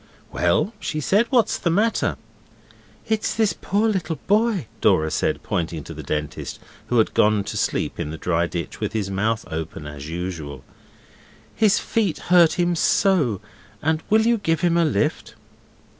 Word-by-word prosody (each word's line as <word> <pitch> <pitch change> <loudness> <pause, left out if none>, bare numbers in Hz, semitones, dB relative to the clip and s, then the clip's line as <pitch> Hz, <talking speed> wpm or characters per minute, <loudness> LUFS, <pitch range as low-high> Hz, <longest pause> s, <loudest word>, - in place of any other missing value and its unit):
'Well,' 220 - +1
she 155 - -3
said, 205 - +2
'what's 240 -5 +2
the 170 - 0
matter?' 210 +7 +1 0.9
'It's 220 -1 0
this 220 -2 +2
poor 205 +4 0
little 180 -6 -1
boy,' 210 - +2 0.2
Dora 80 0 +3
said, - - -1
pointing 80 -3 -2
to - - -8
the - - -7
Dentist, 75 -1 -4 0.3
who 125 - +1
had 110 - +3
gone 105 -1 +3
to - - -6
sleep - - -1
in - - -2
the 80 - -6
dry 85 +1 0
ditch, 85 -2 -5
with - - -3
his 100 -3 -2
mouth 110 +3 0
open 80 -1 -5
as 75 0 -8
usual. 80 -6 -5 0.9
'His 210 -3 +3
feet 205 -9 0 0.2
hurt 170 -3 +7
him 175 -1 +1
so, 155 - +2 0.4
and 160 +1 +1
will 220 +1 +4
you 235 -1 +3
give 165 -4 0
him 175 -2 +2
a 170 -1 +4
lift? 135 -10 -1
155 Hz, 165 wpm, -23 LUFS, -, 0.9 s, hurt